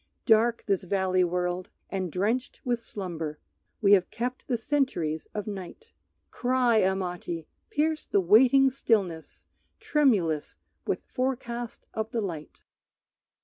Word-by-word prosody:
Dark 230 +1 +4
this 195 -3 +1
valley 185 0 +1
world; 180 +1 -1 0.2
and 185 -3 -2
drenched 220 +8 -1
with 240 -2 0
slumber 170 -8 -5 0.4
We 200 -2 +4
have 190 -3 +5
kept 250 +2 -4
the 245 - +1
centuries 225 - -1
of 210 -2 -2
night. 205 - -8 0.4
Cry, 245 -2 +2
Amati, 180 -3 -2 0.2
pierce 310 +1 0
the 200 - +2
waiting 255 +8 +6
stillness 195 -11 -1 0.3
Tremulous 200 - +1 0.3
with - - -1
forecast 240 -2 -3
of 220 0 -2
the 230 0 -1
light! 165 -7 -6
205 Hz, 120 wpm, -27 LUFS, 180-245 Hz, 0.4 s, waiting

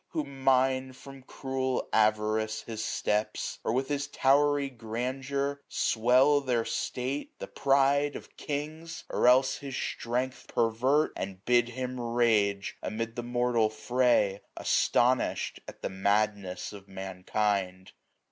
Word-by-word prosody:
Who 155 - 0
mine, 130 -1 +1
from 135 +1 -12
cruel 130 0 -3
avarice, 110 0 +1
his 110 -2 -5
steps; 105 -1 -1
Or - - 0
with 130 +3 0
his 145 -1 -2
towery 145 +1 +3
grandeur 135 +4 -3
swell 130 +6 +3
their 120 -4 0
state. 130 +3 -3
The - - -6
pride 140 +1 +2
of - - -10
kings! 155 +3 -5
or - - +2
else 130 +1 +5
his 140 -2 -7
strength 125 +2 -3
pervert; 125 +7 +1
73a - - -5
And 95 0 -8
bid 120 -1 +3
him 125 +1 -4
rage 110 -5 +1
amid 115 +1 -4
the 120 - -3
mortal 120 -2 +1
fray, 110 -3 +1 0.2
Astonish'd 125 +1 +1
at - - -11
the - - -1
madness 100 0 -1
of 100 -1 -11
mankind. 95 0 -2
125 Hz, 130 wpm, -29 LUFS, 110-135 Hz, 0.2 s, else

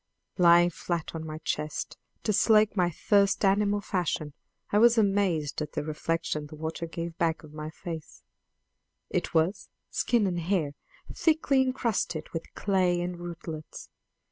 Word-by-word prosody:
Lying 175 0 +6
flat 170 -1 -3
on 160 -1 -5
my 155 0 -5
chest 150 -2 -3 0.3
to 215 - +1
slake 215 0 +4
my 180 -3 +3
thirst 200 +4 +2
animal 205 +1 +3
fashion, 170 -7 -2 0.4
I 205 - +4
was 235 +1 +6
amazed 195 -9 +1
at 150 -1 -4
the - - -2
reflection 155 0 -2
the 155 - -10
water 160 +2 -4
gave 165 0 -5
back 165 -1 0
of 155 -1 -13
my 155 0 -5
face: 160 0 -8 0.9
it - - -2
was, 165 +5 +1 0.2
skin 235 -4 +2
and 175 -2 -1
hair, 170 -4 0 0.4
thickly 315 -5 +3
encrusted 235 -11 -1
with 165 - -5
clay 185 -3 +2
and 175 0 -3
rootlets! 165 -3 -7
175 Hz, 145 wpm, -28 LUFS, 160-200 Hz, 0.9 s, Lying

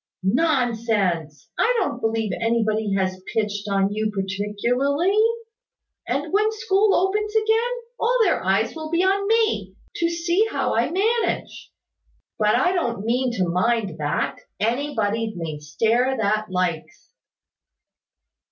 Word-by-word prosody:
"Nonsense! 220 - 0
I - - +3
don't - - -1
believe 225 -2 0
anybody 220 -3 +1
has 185 -1 -1
pitched 210 -2 -1
on 195 0 +1
you 215 0 -1
particularly. 215 - 0 0.9
And 285 +7 -2
when 425 +2 +3
school 425 -2 +2
opens 420 +3 0
again, 445 +2 +2 0.3
all 485 +2 +2
their 375 - +1
eyes 195 +4 +1
will 315 -1 -6
be 340 +2 +1
on 395 +1 +1
me, 450 0 +1 0.2
to 335 - +1
see 340 +5 +1
how - - -1
I - - +1
manage. 445 +6 -1 0.7
But 210 0 +3
I 360 - +3
don't 240 - -2
mean 250 +2 +1
to 185 -6 0
mind 190 -1 0
that. 150 +2 -1 0.2
Anybody 225 -2 -1
may 160 -3 -5
stare 230 - +1
that 215 0 0
likes." 180 -3 -3
230 Hz, 125 wpm, -23 LUFS, -, 0.9 s, I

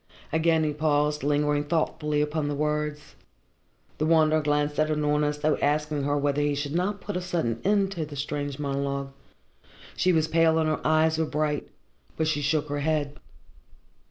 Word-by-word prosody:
Again 160 0 +3
he 150 -1 0
paused, 150 0 +1
lingering 145 +1 +1
thoughtfully 150 -1 0
upon 150 0 -1
the 145 - -2
words. 150 0 -2 0.9
The 155 - +1
Wanderer 155 -1 +4
glanced 145 0 0
at 155 - +3
Unorna 150 -1 +1
as 150 0 -2
though 150 +1 +1
asking 150 -1 0
her 145 0 +1
whether 145 0 0
he 145 0 +1
should 145 0 -3
not 195 +4 -1
put 205 - -5
a 180 - -1
sudden 165 -11 -2
end 200 -1 +2
to 170 -5 -3
the 145 - -9
strange 145 0 -3
monologue. 140 -1 -2 0.8
She 185 - +2
was 160 -2 +2
pale 160 0 +3
and 160 -1 +2
her 155 - -1
eyes 155 +1 +2
were 160 - +2
bright; 150 -1 -1 0.5
but 160 - 0
she 155 -2 0
shook 150 +1 0
her 145 0 -2
head. 150 -1 -1
150 Hz, 180 wpm, -26 LUFS, 145-160 Hz, 0.9 s, Wanderer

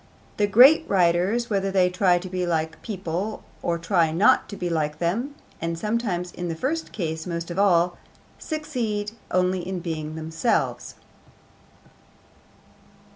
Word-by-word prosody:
The 205 - +2
great 255 +11 +7
writers, 190 +6 +2
whether 195 -1 +1
they 190 -2 +3
try 180 -1 +3
to 180 +2 -6
be 185 0 -3
like 160 -2 0
other - - -18
people 195 0 -4 0.2
or 170 0 0
try 170 -1 +1
not 185 +6 +3
to 200 - -7
be 180 - -3
like 155 -3 -1
them 225 - -2 0.3
(and 165 0 -2
sometimes 200 -3 -2
in 175 - -5
the 165 - -3
first 310 - -2
case 160 -3 -4
most 170 0 -4
of 175 - -3
all), 175 -3 +3 0.4
succeed 240 -10 -3 0.2
only 185 0 +1
in 180 +1 -4
being 155 -3 -4
themselves. 160 +8 -1
180 Hz, 145 wpm, -24 LUFS, 170-210 Hz, 0.4 s, great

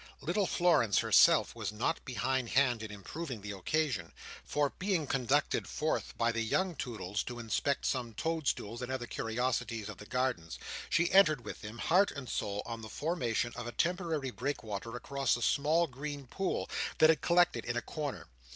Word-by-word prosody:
Little 180 +6 0
Florence 150 - +3
herself - - +5
was - - -3
not 120 +10 -1
behind 130 0 -1
hand 125 -4 +3
in 110 - -5
improving 115 - -6
the 105 +1 -5
occasion; 100 - -1 0.3
for, 145 -1 0
being 185 -5 +1
conducted 130 -4 +1
forth - - -2
by 115 0 +2
the 115 0 -1
young 180 +10 0
Toodles 110 -6 -3
to 120 - -6
inspect 120 +4 -1
some 120 -4 -1
toad 160 +1 -2
stools 115 +4 -1
and 125 +1 -4
other 130 -2 -2
curiosities 115 -2 -2
of 105 - -8
the 105 - -10
Gardens, 125 -11 -1 0.3
she 170 0 +2
entered 155 -10 +5
with - - -7
them, 105 +2 -8
heart 185 +10 +4
and 140 -3 -7
soul, 100 -2 -2
on 115 -1 -5
the 110 - -8
formation 125 -7 -1
of 120 - -5
a - - -4
temporary 165 -4 -1
breakwater 115 -4 -4
across 135 +1 0
a - - -7
small 155 +7 +3
green 140 0 -6
pool 190 +9 -2 0.3
that 160 0 +7
had 160 - -1
collected 170 -9 +3
in 120 0 -2
a - - 0
corner. 150 -4 -4
130 Hz, 180 wpm, -32 LUFS, 115-155 Hz, 0.3 s, that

